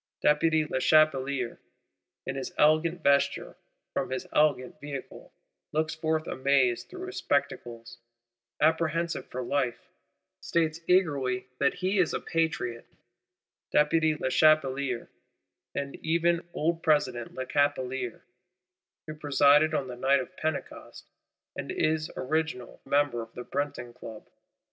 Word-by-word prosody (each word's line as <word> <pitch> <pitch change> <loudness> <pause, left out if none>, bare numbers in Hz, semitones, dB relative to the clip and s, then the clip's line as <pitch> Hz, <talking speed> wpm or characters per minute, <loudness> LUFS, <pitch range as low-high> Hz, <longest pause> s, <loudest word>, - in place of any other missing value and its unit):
Deputy 155 +1 +3
Lechapelier, 140 -3 +2 0.7
in - - -3
his 135 -1 -4
elegant 155 +3 +3
vesture, 140 0 +2 0.4
from - - -1
his 130 0 -3
elegant 145 -4 +2
vehicle, 145 -2 -8 0.4
looks 155 +1 0
forth 160 0 -1
amazed 130 -4 +1
through 370 0 -7
his 375 - -7
spectacles; 120 -4 -2 0.6
apprehensive 165 +1 +1
for 130 0 -5
life;—states 145 +5 -3
eagerly 140 -9 +2
that 140 - +2
he 190 +2 0
is 180 - +2
Patriot 155 -8 -1 0.8
Deputy 155 +1 +3
Lechapelier, 140 -3 +2 0.7
and 140 0 -3
even 170 +1 +1
Old 165 +1 -1
President 130 -7 +1
Lechapelier, 130 -2 -1 0.8
who 155 - -6
presided 145 0 +4
on 135 - 0
the 125 - -6
Night 135 +3 +3
of 130 - -7
Pentecost, 155 -2 -5 0.5
and - - -5
is 155 0 0
original 155 -3 -2
member 140 -4 +1
of 115 0 -11
the 125 - -6
Breton 120 -3 -4
Club. 115 -3 -10
145 Hz, 110 wpm, -28 LUFS, 130-160 Hz, 0.8 s, presided